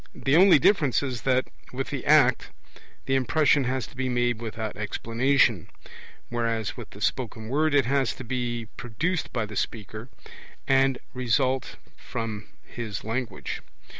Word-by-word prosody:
The 135 +2 +1
only 185 0 +8
difference 145 - +3
is 125 -5 -3
that 130 0 +2 0.2
with 135 +1 -4
the 135 -3 -3
act 145 -4 +5 0.6
the 135 - 0
impression 135 +1 +3
has 130 -2 -1
to - - -15
be 130 0 -2
made 120 -1 0
without 110 -1 -4
explanation; 115 0 +1 0.6
whereas 115 -2 -1
with 120 -4 -9
the 100 - -13
spoken 110 -2 -2
word 150 +3 +2
it 140 - +4
has 135 0 +1
to 130 - -8
be 120 -1 -3
produced 155 - -2
by 115 -3 -1
the 105 0 -9
speaker, 110 +3 -4 0.6
and 135 -1 +3 0.2
result 130 +1 0 0.2
from 110 -3 -5 0.2
his 110 -4 -6
language. 120 +3 -4
125 Hz, 145 wpm, -26 LUFS, 115-135 Hz, 0.6 s, only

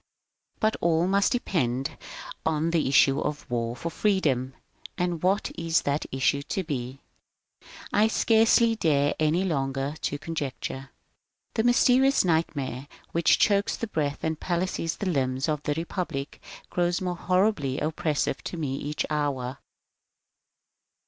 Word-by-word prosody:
But 220 0 +2
all 165 0 +3
must 195 +1 +2
depend 135 - -1 0.5
on 160 +1 0
the 165 -4 +1
issue 135 0 +5
of 150 0 -2
the 125 - -7
war 115 0 -1
for 165 +7 -5
Freedom. 140 - 0 0.4
And 175 -3 -1
what 195 +3 +1
is 165 0 +1
that 145 +1 -1
issue 135 +1 +1
to 190 +6 -3
be? 135 -4 -5 0.9
I 210 +1 +5
scarcely 225 +1 +4
dare, 145 -7 +2
any 155 +4 +2
longer, 135 -4 -1
to 145 - -1
conjecture. 140 -3 -5 0.6
This 225 +1 +1
mysterious 255 +1 +4
nightmare, 145 -6 -1 0.2
which 170 0 +3
chokes 200 -1 +2
the - - -3
breath 150 -8 -2
and 160 -1 -1
palsies 175 -2 -2
the 205 - -4
limbs 130 -4 0
of 150 -2 -1
the 145 0 -1
Republic, 165 -4 -4 0.3
grows 175 +1 +1
more 180 -2 -2
horribly 180 -7 +1
oppressive 155 -2 -1
to 175 - -5
me 140 -5 -2
each 150 +2 -3
hour. 140 -4 -2
160 Hz, 135 wpm, -26 LUFS, 140-185 Hz, 0.9 s, issue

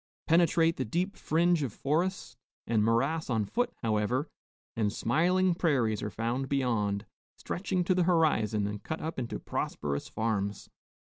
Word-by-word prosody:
Penetrate 165 0 +3
the 130 - 0
deep 175 - -1
fringe 170 +1 +2
of 135 -5 -2
forest 170 - -1 0.3
and 110 -2 +2
morass 135 +9 +1
on 110 -4 +1
foot, 245 - -1
however, 115 +6 0 0.5
and 105 -3 +1
smiling 175 - +2
prairies 130 - +1
are 105 - -2
found 120 +6 -2
beyond, 115 -7 0 0.3
stretching 185 -1 -2
to 185 - +2
the 180 -1 +2
horizon 115 - +2
and 105 0 -4
cut 160 - -4
up 160 -3 -4
into 120 -2 -3
prosperous 70 -1 -3
farms. 105 -3 -2
135 Hz, 145 wpm, -30 LUFS, 110-170 Hz, 0.5 s, Penetrate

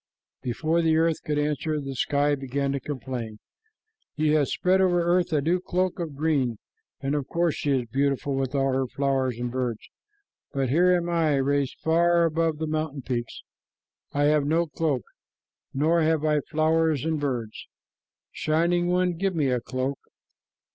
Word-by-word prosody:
Before 155 +7 0
the 160 -1 +3
earth 165 -1 +1
could 150 -1 -1
answer, 150 +1 -1
the 135 -1 -5
sky 145 +3 +1
began 140 0 -2
to 140 - -1
complain. 125 -5 -5 0.8
"You 155 0 +2
have 145 -3 +2
spread 185 +1 +2
over 180 -2 +3
earth 175 +1 +2
a 150 -2 +2
new 175 +4 +2
cloak 185 0 -1
of 160 -4 -4
green, 140 -6 0 0.4
and 140 +1 -1
of 145 -3 -1
course 170 -2 +1
she 145 - -3
is 125 - -5
beautiful 140 +2 0
with 135 0 -2
all 135 -1 +1
her 130 0 0
flowers 135 -2 0
and 120 0 -3
birds, 125 -3 -3 0.6
but 135 -3 0
here 175 +7 +4
am 175 -1 +1
I, 165 -4 +2
raised 140 0 0
far 170 +1 +3
above 165 -1 0
the 160 - -2
mountain 155 -3 -3
peaks. 120 -2 -4 0.7
I 145 - 0
have 150 0 +3
no 165 +3 +2
cloak, 150 -6 -1 0.7
nor 160 +5 +2
have 155 -1 +1
I 150 -1 +3
flowers 160 -1 +1
and 160 -1 0
birds. 120 -6 -4 0.6
Shining 170 +3 +1
One, 180 0 +2
give 190 +2 -1
me 145 -5 +1
a 125 -1 0
cloak." 130 +3 -3
150 Hz, 170 wpm, -26 LUFS, 135-165 Hz, 0.8 s, here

